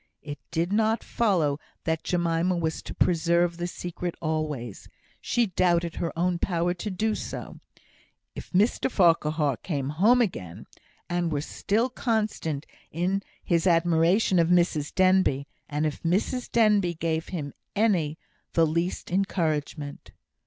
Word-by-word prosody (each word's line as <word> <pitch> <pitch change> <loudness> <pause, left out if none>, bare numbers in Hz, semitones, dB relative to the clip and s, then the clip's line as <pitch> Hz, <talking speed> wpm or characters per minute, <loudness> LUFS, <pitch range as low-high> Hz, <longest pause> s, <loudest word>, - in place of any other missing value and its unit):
It 145 -1 -7
did 170 +3 -1
not 220 +1 +2
follow 170 -11 +1 0.2
that 160 -1 -1
Jemima 175 0 +1
was 160 -1 -2
to - - -8
preserve 170 0 +2
the 175 0 -2
secret 175 0 -5
always; 155 - -3 0.3
she 240 - +1
doubted 175 -3 +1
her 170 - -2
own 175 0 +1
power 175 -1 0
to 180 +4 -5
do 215 +3 0
so, - - -6 0.7
if - - -9
Mr 200 +8 +2
Farquhar 155 - +2
came 140 -6 -3
home 205 +12 +4
again, 95 - -2 0.4
and 175 -1 -1
were 145 - 0
still 210 - 0
constant 215 - -2 0.2
in 185 +5 -1 0.2
his 170 +1 +1
admiration 170 +3 +3
of 165 - +4
Mrs 170 -4 +2
Denbigh, 185 -7 +3 0.2
and 150 +1 -1
if 150 - -3
Mrs 205 +9 -1
Denbigh 210 -6 +3
gave 160 0 -1
him 150 -6 -5 0.2
any 180 -8 +2 0.4
the 165 - +4
least 170 +4 -2
encouragement. 155 -6 -2
170 Hz, 135 wpm, -26 LUFS, 160-190 Hz, 0.7 s, home